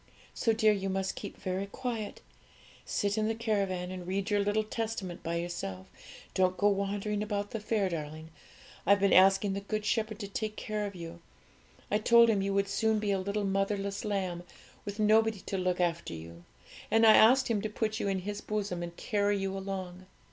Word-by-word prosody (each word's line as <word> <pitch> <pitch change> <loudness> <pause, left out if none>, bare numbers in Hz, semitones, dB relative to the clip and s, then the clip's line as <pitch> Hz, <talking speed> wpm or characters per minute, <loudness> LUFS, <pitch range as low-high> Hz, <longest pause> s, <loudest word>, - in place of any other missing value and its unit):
So, 230 - +1
dear, 220 -1 +4
you 195 -1 -2
must 190 0 -1
keep - - -7
very 190 +2 -3
quiet. 230 -1 -5 0.6
Sit 205 +1 0
in 215 - +1
the 225 - 0
caravan 195 -5 -1
and 180 -1 -7
read 195 +3 -2
your 205 - +3
little 205 +2 +1
Testament 215 -5 -4
by 165 +1 -3
yourself; 170 - -4 0.5
don't 185 -1 +2
go 205 - +4
wandering 205 +1 -1
about 205 -1 -2
the 225 - -3
fair, 210 -2 0
darling. 155 -1 -6 0.5
I've 200 +3 +4
been 200 -1 +3
asking 195 +1 +5
the 195 - -2
Good 215 +1 -3
Shepherd 215 -1 0
to 205 -2 -5
take 215 +1 -4
care 210 -1 -3
of 200 - -9
you; 170 -1 -8 0.7
I 210 - +3
told 235 +1 +6
Him 200 -3 +1
you 195 +1 -1
would 200 0 +2
soon 220 +2 +1
be 210 -1 0
a 195 - +1
little 200 +2 -2
motherless 195 0 -1
lamb, 190 -5 -2 0.4
with 205 0 -5
nobody 220 -1 +3
to 195 - -4
look 180 0 0
after 170 - -1
you, 85 +1 -11 0.4
and 225 0 +5
I 220 - +9
asked 255 +6 +6
Him 220 -3 0
to 215 - -3
put 215 0 -2
you - - -1
in 190 -1 0
His 205 +2 -5
bosom 205 -4 -3
and 170 0 -6
carry 205 -3 +1
you 195 0 -2
along. 185 -2 -5
200 Hz, 200 wpm, -30 LUFS, 185-215 Hz, 0.7 s, I